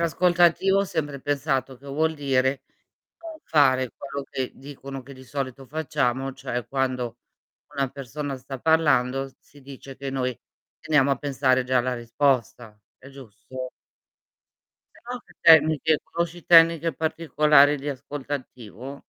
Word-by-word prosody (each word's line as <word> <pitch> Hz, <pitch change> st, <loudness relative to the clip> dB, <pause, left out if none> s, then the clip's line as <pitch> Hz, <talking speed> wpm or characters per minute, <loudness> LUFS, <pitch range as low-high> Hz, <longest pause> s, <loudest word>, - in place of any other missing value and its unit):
ascolto 175 Hz, +1 st, +1 dB
attivo 190 Hz, +3 st, +4 dB
ho 200 Hz, -, +2 dB
sempre 145 Hz, -6 st, -4 dB
pensato 135 Hz, -2 st, -1 dB
che 135 Hz, -, -23 dB
vuol 160 Hz, +3 st, 0 dB
dire: 135 Hz, -2 st, 0 dB, 0.6 s
non 325 Hz, -1 st, -9 dB
fare 130 Hz, -4 st, +3 dB
quello 140 Hz, -1 st, -6 dB
che 130 Hz, -1 st, -3 dB
dicono 135 Hz, -1 st, -9 dB
che 140 Hz, +2 st, -13 dB
di 130 Hz, 0 st, -13 dB
solito 135 Hz, 0 st, -5 dB
facciamo, 135 Hz, -3 st, -1 dB
cioè 130 Hz, -3 st, -5 dB
quando 125 Hz, -3 st, -2 dB, 0.6 s
una 135 Hz, -1 st, 0 dB
persona 140 Hz, +1 st, -6 dB
sta 135 Hz, +1 st, -8 dB
parlando, 135 Hz, -3 st, +2 dB
si 145 Hz, -, -20 dB
dice 135 Hz, 0 st, -11 dB
che 140 Hz, 0 st, -6 dB
noi: 130 Hz, -2 st, -2 dB, 0.4 s
"Teniamo 145 Hz, -3 st, +2 dB
a 140 Hz, -, +2 dB
pensare 130 Hz, -1 st, +1 dB
già 130 Hz, +1 st, 0 dB
alla 125 Hz, +1 st, 0 dB
risposta." 120 Hz, -2 st, -1 dB, 0.2 s
È 130 Hz, -, -15 dB
giusto? 130 Hz, 0 st, -9 dB, 1.2 s
Se -, -, -19 dB
no, 250 Hz, 0 st, -4 dB
che -, -, -21 dB
tecniche 155 Hz, -1 st, +5 dB
conosci 170 Hz, 0 st, -4 dB
tecniche 165 Hz, -1 st, +6 dB
particolari 150 Hz, -1 st, +3 dB
di 145 Hz, +1 st, -6 dB
ascolto 140 Hz, +1 st, -6 dB
attivo? 130 Hz, 0 st, -7 dB
140 Hz, 140 wpm, -24 LUFS, 130-150 Hz, 1.2 s, tecniche